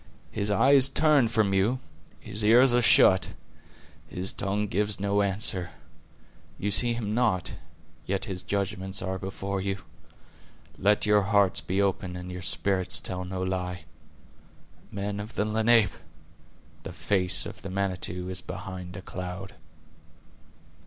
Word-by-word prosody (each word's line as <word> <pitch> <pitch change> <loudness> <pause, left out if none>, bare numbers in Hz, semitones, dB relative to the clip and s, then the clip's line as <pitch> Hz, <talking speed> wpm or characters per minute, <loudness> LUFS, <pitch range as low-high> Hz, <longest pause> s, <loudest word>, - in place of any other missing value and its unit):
His 105 -1 -2
eye 130 +7 +4
is 135 -1 +7
turned 145 -4 +3
from 110 -4 +1
you; 100 +7 +2 0.4
His 105 0 -3
ears 120 +4 +6
are 120 - +4
shut; 95 -4 +5 0.7
His 90 +2 -2
tongue 105 +1 -1
gives 105 +1 -1
no 100 +1 +1
answer. 95 -2 -1 0.9
You 105 - -2
see 120 +4 +3
him 105 -3 -3
not; 110 -6 0 0.5
yet 100 +3 -1
His 95 -5 -5
judgments 95 -1 -3
are 95 0 -3
before 95 0 -4
you. 95 -1 -3 1.0
Let 105 +2 +3
your 105 0 +4
hearts 100 -2 +2
be 95 +2 -2
open 95 -2 -2
and 90 0 -7
your 90 0 -6
spirits 95 0 0
tell 90 -1 -5
no 95 0 -4
lie. 90 -2 -3 1.1
Men 100 +1 -4
of 105 +2 -8
the 105 - 0
Lenape! 110 -1 +3 0.9
the 80 +2 -8
face 90 -2 0
of - - -9
the 95 - -7
Manitou 90 -1 -3
is 95 0 -2
behind 90 -1 -7
a 95 - -9
cloud." 90 +1 -7
100 Hz, 140 wpm, -27 LUFS, 95-105 Hz, 1.1 s, is